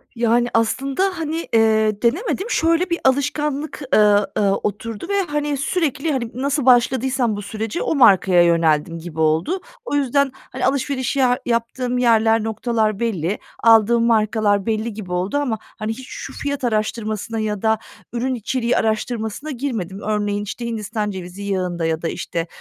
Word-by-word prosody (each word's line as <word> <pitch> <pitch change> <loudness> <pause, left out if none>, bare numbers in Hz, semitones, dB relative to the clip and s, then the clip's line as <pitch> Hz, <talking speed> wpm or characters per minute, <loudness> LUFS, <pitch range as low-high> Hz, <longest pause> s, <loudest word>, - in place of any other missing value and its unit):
Yani, 235 +1 +2
aslında, 275 - 0
hani, 325 +1 -3
eee, 220 -2 +3
denemedim. 380 - 0
Şöyle 335 -2 +2
bir 340 - 0
alışkanlık, 290 +2 0
ııı, 210 -1 +5
ııı, 200 -2 +3
oturdu 210 - -4
ve, 400 0 +2
hani, 295 -1 -1
sürekli, 305 0 -1
hani, 235 -4 -2
nasıl 280 +2 -1
başladıysam 250 -1 +3
bu 205 - -5
sürece 215 +2 -4
o - - 0
markaya 190 -7 +5
yöneldim 165 -1 +2
gibi 160 -1 -8
oldu. 160 - +1 0.3
O 290 - -2
yüzden, 280 0 +2
hani, - - -5
alışveriş 265 0 0
ya 250 -2 +3
yaptığım 245 +2 -1
yerler, 225 -2 +3
noktalar 220 -1 -1
belli. 205 -5 -1 0.2
Aldığım 230 +1 +5
markalar 215 -3 +2
belli 220 0 -1
gibi 195 -4 -8
oldu 185 +10 -1
ama, 255 -6 -1
hani, 215 0 -6
hiç 260 +3 -8
şu - - -7
fiyat 285 -2 -4
araştırmasına 220 -1 -2
ya 210 -2 -2
da 220 -1 +2 0.4
ürün 255 +2 -1
içeriği 245 +1 -1
araştırmasına 220 +5 -2
girmedim. 225 -8 -4
Örneğin, 205 -1 -1
işte, 235 +3 -6
Hindistan 215 -2 -3
cevizi 185 +1 -7
yağında 180 -4 -2
ya 160 0 -1
da, 165 - -2
işte, 170 -1 -4
230 Hz, 155 wpm, -20 LUFS, 205-265 Hz, 0.4 s, ııı